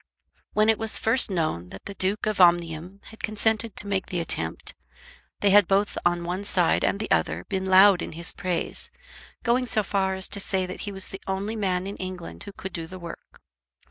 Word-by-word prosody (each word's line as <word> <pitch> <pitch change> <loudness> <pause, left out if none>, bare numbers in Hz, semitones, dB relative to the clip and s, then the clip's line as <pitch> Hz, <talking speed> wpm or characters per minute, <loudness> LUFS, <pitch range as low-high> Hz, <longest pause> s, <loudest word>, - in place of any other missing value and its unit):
When 215 0 +3
it 220 -1 +3
was 225 -1 +4
first 230 +2 +4
known 155 - -1
that 95 - -11
the 200 - -6
Duke 195 +2 -1
of 215 -3 +1
Omnium 175 +2 +2
had 220 - -13
consented 220 +1 0
to - - +1
make 195 -2 -1
the 180 - -2
attempt, 85 - -2 0.7
they 200 - +4
had 205 -2 +6
both 200 +1 +1
on 175 0 +1
one 180 +3 -3
side 180 -4 +2
and 200 - +1
the 215 - -4
other 80 +1 +1
been 190 0 -2
loud 190 0 +7
in - - -5
his 170 +1 -2
praise, 180 -2 -1 0.5
going 250 +1 +2
so 215 -2 +1
far 195 -1 0
as 190 0 0
to 200 - -2
say 190 -1 -1
that 185 +1 -7
he - - -6
was 190 -1 -2
the 195 - -8
only 195 +3 -2
man 185 -4 -1
in 200 +1 -6
England 185 -2 -7
who 200 - -7
could 190 -1 -8
do 165 -1 -5
the 185 +2 -9
work. 170 -2 -11
190 Hz, 210 wpm, -25 LUFS, 175-205 Hz, 0.7 s, loud